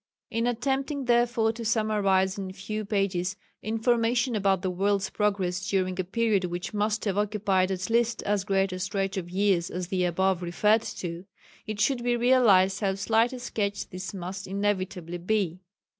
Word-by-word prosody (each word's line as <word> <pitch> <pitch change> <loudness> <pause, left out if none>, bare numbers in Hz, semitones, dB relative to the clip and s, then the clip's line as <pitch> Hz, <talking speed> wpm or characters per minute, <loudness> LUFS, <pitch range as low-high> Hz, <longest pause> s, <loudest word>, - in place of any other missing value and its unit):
In 230 +1 0
attempting, 270 +3 -1
therefore, 240 -2 +2
to 230 +1 -7
summarize 205 -4 +2
in 195 -3 -5
a - - -8
few 215 +3 -5
pages 195 -2 0 0.3
information 235 +2 +1
about 195 -2 +1
the 185 - 0
world's 200 +2 0
progress 190 -3 -1
during 185 -1 0
a - - +2
period 205 0 +1
which 175 +3 -5
must 210 +1 0
have 200 -1 0
occupied 200 -3 +1
at 185 -1 -2
least 235 0 +1
as 205 -1 0
great 195 -1 +1
a 185 - -5
stretch 195 +1 -2
of 180 -3 -4
years 185 -2 +1
as 180 -1 -5
that 185 -1 0
above 190 +1 +1
referred 210 +5 +2
to, 175 -3 -6 0.4
it 215 -1 +1
must 260 -4 -2
be 240 0 +1
realized 215 -6 +4
how 195 -2 0
slight 225 +5 +2
a 255 - -6
sketch 205 -4 -3
this 185 0 -5
must 195 +1 -6
inevitably 185 -3 -2
be. 185 -2 -1
200 Hz, 175 wpm, -27 LUFS, 185-225 Hz, 0.4 s, realized